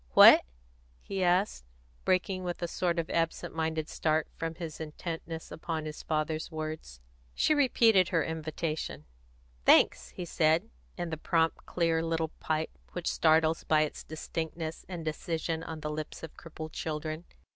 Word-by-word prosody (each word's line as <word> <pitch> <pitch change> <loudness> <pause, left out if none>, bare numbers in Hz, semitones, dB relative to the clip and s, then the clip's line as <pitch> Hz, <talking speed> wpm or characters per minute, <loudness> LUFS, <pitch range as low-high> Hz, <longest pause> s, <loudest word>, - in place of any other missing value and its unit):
"What?" - - +10 0.6
he 195 -1 -2
asked, 180 - +2 0.4
breaking 185 0 +1
with 175 0 -3
a - - +1
sort 175 0 0
of 165 -1 0
absent 165 -1 -1
minded 160 -1 -1
start 155 -2 +1
from 165 0 -3
his 165 -2 -6
intentness 160 +1 -6
upon 160 -1 -3
his 155 0 -6
father's 155 0 -1
words. 155 - -5 0.4
She - - +3
repeated 230 - +5
her 165 -3 +2
invitation. 160 0 -3 0.6
"Thanks!" - - +5
he 180 - -6
said, 165 +5 +2 0.3
in 175 -2 -3
the 160 - -2
prompt, 165 +1 +1
clear 165 -2 +1
little 165 -1 0
pipe 155 0 -2
which 175 -1 -5
startles 160 0 +3
by 155 -1 +4
its 155 - -2
distinctness 160 +1 -5
and 170 -3 -5
decision 160 +1 -2
on 160 -1 -6
the 150 0 -3
lips 155 +1 -5
of 160 - -7
crippled 160 -1 -8
children. 155 +1 -4
160 Hz, 150 wpm, -30 LUFS, 155-170 Hz, 0.6 s, What